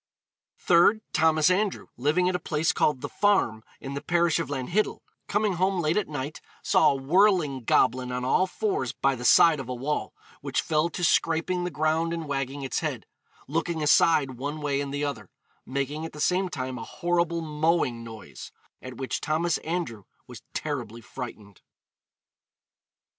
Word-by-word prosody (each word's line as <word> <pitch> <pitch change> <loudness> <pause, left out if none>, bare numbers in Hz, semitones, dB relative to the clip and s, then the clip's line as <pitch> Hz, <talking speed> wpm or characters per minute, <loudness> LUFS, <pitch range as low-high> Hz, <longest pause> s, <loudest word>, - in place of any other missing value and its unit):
Third: 180 +5 +4
Thomas 160 0 +4
Andrew, 200 +1 0
living 150 +8 +1
at 185 - +1
a - - 0
place 160 -1 0
called 145 -4 +1
The - - -3
Farm, 190 - +1 0.2
in 135 - -7
the 140 - -4
parish 170 -2 +2
of 165 - -2
Lanhiddel, 145 +10 -1 0.3
coming 205 -1 +1
home 190 +1 +1
late 155 -1 +1
at 210 - 0
night 145 0 -5 0.2
saw - - +4
a - - +1
whirling 150 - +2
goblin 125 +2 +2
on 125 0 -3
all 185 +8 +3
fours 410 - -2
by 135 0 +1
the 125 -2 -7
side 160 +4 +6
of 130 -2 -7
a 125 - -3
wall, 140 +5 -3 0.3
which - - -1
fell 155 +1 +1
to 175 - -5
scraping 170 +2 +1
the - - -1
ground 160 +2 0
and 165 -2 -4
wagging 140 0 -3
its 130 - -1
head, - - -4 0.4
'looking 160 +1 -2
aside 145 -4 +3
one 145 +3 -4
way 140 -2 -1
and 140 -1 -4
the 145 +1 -2
other,' 110 -9 -5 0.4
making 140 +3 -3
at 165 - -6
the 150 - -10
same 185 +4 +1
time 130 -5 -4
a - - -6
horrible 170 +2 -1
mowing 150 -6 0
noise; 110 -2 -10 0.3
at 130 -2 -9
which 130 -1 -3
Thomas 160 +2 0
Andrew 155 - -4 0.2
'was - - -11
terribly 115 +2 -4
frightened.' 105 -3 -9
150 Hz, 170 wpm, -26 LUFS, 130-170 Hz, 0.4 s, side